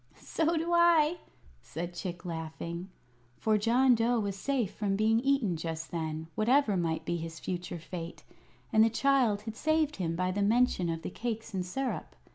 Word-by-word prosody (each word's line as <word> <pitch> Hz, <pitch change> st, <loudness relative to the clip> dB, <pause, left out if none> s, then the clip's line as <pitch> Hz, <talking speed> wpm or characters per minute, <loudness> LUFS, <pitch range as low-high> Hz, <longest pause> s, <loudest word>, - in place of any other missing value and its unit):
"So 330 Hz, +1 st, 0 dB
do 335 Hz, +2 st, -1 dB
I," 340 Hz, -1 st, +5 dB, 0.4 s
said 170 Hz, -, -6 dB
Chick, 175 Hz, 0 st, -6 dB
laughing; 170 Hz, +2 st, -5 dB, 0.5 s
for 220 Hz, -1 st, +2 dB
John 245 Hz, +4 st, +4 dB
Dough 235 Hz, +1 st, +2 dB
was 200 Hz, -2 st, -2 dB
safe 245 Hz, -1 st, -1 dB
from 200 Hz, -2 st, -1 dB
being 220 Hz, +2 st, +3 dB
eaten 260 Hz, -8 st, +1 dB
just 160 Hz, 0 st, -5 dB
then, 160 Hz, -1 st, -3 dB
whatever 230 Hz, 0 st, +3 dB
might 165 Hz, -3 st, -1 dB
be 170 Hz, -, -1 dB
his 165 Hz, -1 st, -6 dB
future 175 Hz, -1 st, -4 dB
fate, 165 Hz, +1 st, -7 dB, 0.5 s
and 220 Hz, 0 st, +6 dB
the 225 Hz, -, +4 dB
child 235 Hz, -4 st, +2 dB
had 220 Hz, 0 st, -6 dB
saved 310 Hz, +2 st, +1 dB
him 165 Hz, -3 st, -1 dB
by 185 Hz, +1 st, 0 dB
the 205 Hz, +2 st, -1 dB
mention 210 Hz, -4 st, +2 dB
of 165 Hz, 0 st, -3 dB
the -, -, -4 dB
cakes 225 Hz, 0 st, -4 dB
and 185 Hz, -1 st, -1 dB
syrup. 260 Hz, +9 st, -4 dB
205 Hz, 175 wpm, -30 LUFS, 170-250 Hz, 0.5 s, and